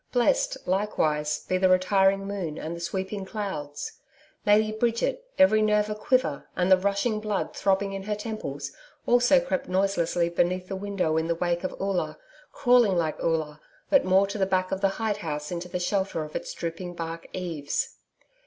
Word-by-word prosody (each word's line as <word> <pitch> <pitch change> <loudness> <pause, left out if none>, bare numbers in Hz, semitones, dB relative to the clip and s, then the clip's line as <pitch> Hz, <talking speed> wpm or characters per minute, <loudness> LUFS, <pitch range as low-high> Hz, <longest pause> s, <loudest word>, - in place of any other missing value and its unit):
Blessed, - - +2
likewise, 155 -6 0
be 185 - 0
the 185 0 +4
retiring 195 +1 +3
moon 190 -6 -4
and 160 +2 -4
the - - -7
sweeping 190 +3 -3
clouds! 190 -8 -5 0.5
Lady 215 +1 +5
Bridget, 235 - -1
every 250 -7 +6
nerve 210 0 +2
a - - +1
quiver 210 - 0
and 180 +1 +1
the 190 - +8
rushing 200 +3 0
blood 210 -2 -2
throbbing 195 0 +1
in 195 - -4
her 210 0 -1
temples, 175 -11 -5 0.3
also 245 +3 +5
crept 195 -10 -2
noiselessly 180 -3 +1
beneath 180 +2 0
the 195 - -3
window 190 -5 -1
in 160 0 0
the 170 - +1
wake 175 +1 -1
of 185 - -4
Oola, 195 -2 -1 0.3
crawling 245 -7 +4
like 160 -3 -1
Oola, 160 -2 -1 0.3
but 280 - +6
more 190 +1 +4
to 200 +1 -5
the 190 - +2
back 185 -1 0
of 190 - -2
the 195 - +4
hide 220 -2 0
house 150 -5 -4
into 175 0 -4
the 180 - -2
shelter 190 -2 -1
of 155 - -10
its - - -4
drooping 175 +1 -5
bark 165 0 -5
eaves. 165 -6 -3
190 Hz, 180 wpm, -26 LUFS, 170-210 Hz, 0.5 s, the